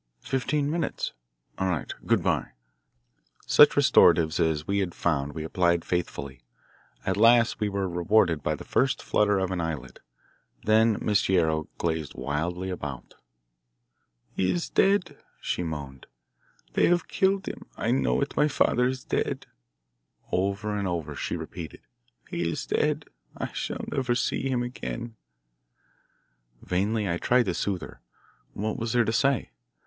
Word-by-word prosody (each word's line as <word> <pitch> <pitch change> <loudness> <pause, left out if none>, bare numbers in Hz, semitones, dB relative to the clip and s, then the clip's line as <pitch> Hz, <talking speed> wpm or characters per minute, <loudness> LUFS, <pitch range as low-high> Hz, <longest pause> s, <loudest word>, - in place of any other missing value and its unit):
Fifteen 140 +2 0
minutes? 170 +1 -2 0.5
All 95 - +1
right. 85 -5 -2
Good - - +3
bye." - - 0 0.9
Such - - +7
restoratives 80 -1 +5
as 80 -2 +1
we 100 +2 0
had 90 -3 -2
found 75 -4 0
we 80 0 -5
applied 85 +1 +1
faithfully. 70 -6 -3 0.6
At - - 0
last 115 +1 +5
we 105 -1 0
were 100 -1 -1
rewarded 90 -2 +2
by 75 +2 0
the - - -9
first 130 0 +1
flutter 105 -1 +2
of 95 -1 -1
an 90 -2 -1
eyelid. 75 -7 -5 0.6
Then 110 0 +4
Miss 105 -2 +1
Guerrero 80 -4 +1
gazed 80 -4 -2
wildly 90 +6 -2
about. 75 -7 -6 1.2
"He 95 - +1
is 175 - -2
dead," 195 -2 +2 0.2
she - - -2
moaned. 70 -6 -6 0.7
"They - - +4
have 175 -1 +2
killed 195 0 +1
him. - - -6
I 115 - 0
know 135 +2 +2
it. 140 - -2
My 150 - +4
father 125 -4 +2
is 130 -1 -3
dead." - - -2 0.9
Over 100 +3 0
and 100 -2 -1
over 85 -4 -3
she - - -3
repeated: 80 -3 -8 0.5
"He 85 -1 -2
is - - -3
dead. - - 0 0.3
I - - -4
shall - - -4
never 130 -4 0
see 135 +2 -1
him 125 -2 0
again." 120 -1 -5 1.5
Vainly 100 +4 0
I 85 -2 0
tried 125 0 +3
to 95 - -1
soothe 95 0 -2
her. - - -11 0.5
What 110 +2 -2
was 115 -1 -2
there 120 -2 +3
to 110 - 0
say? 135 - +1
95 Hz, 150 wpm, -27 LUFS, 80-120 Hz, 1.5 s, Such